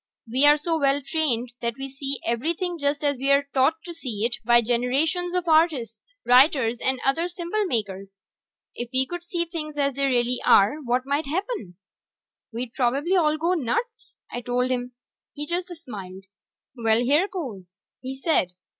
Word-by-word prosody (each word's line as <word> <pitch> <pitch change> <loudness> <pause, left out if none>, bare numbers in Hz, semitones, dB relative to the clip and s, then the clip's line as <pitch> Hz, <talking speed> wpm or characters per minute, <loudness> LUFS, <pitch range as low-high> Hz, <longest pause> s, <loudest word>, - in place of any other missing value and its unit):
We 260 +5 +4
are 295 +1 +7
so 320 +2 -1
well 275 0 +2
trained 255 -7 0
that 235 -1 -1
we 270 0 -5
see 275 +1 -5
everything 335 +9 -1
just 285 +1 -1
as 285 -2 +1
we 270 +2 -1
are 280 0 +3
taught 265 +4 +3
to 345 - -7
see 235 -10 -3
it 240 +1 -1
by 240 +1 +5
generations 280 +10 +1
of 360 -1 -1
artists, 315 - +1
writers, 250 -2 +4
and 260 -1 +1
other 325 +6 +1
symbol 355 +4 -2
makers. 195 - -3 0.6
If 240 0 -5
we 260 0 +3
could 350 +4 -6
see 345 0 -2
things 305 -3 -6
as 280 -1 +1
they 275 +1 0
really 245 -1 +1
are, 200 +9 +5
what 250 +2 0
might 285 +2 -1
happen?" 340 - -4 0.7
"We'd 235 +1 -5
probably 275 +9 +1
all 310 -4 +3
go 335 +3 +1
nuts!" 410 - -3 0.2
I 245 - -4
told 250 +1 0
him. 250 0 -2 0.4
He 295 - -6
just 350 +3 -2
smiled. 200 - -9 0.5
"Well, 225 -1 +2
here 295 +9 +3
goes," 205 - -8 0.2
he 265 +1 -7
said. 270 - +1
275 Hz, 170 wpm, -24 LUFS, 240-325 Hz, 0.7 s, are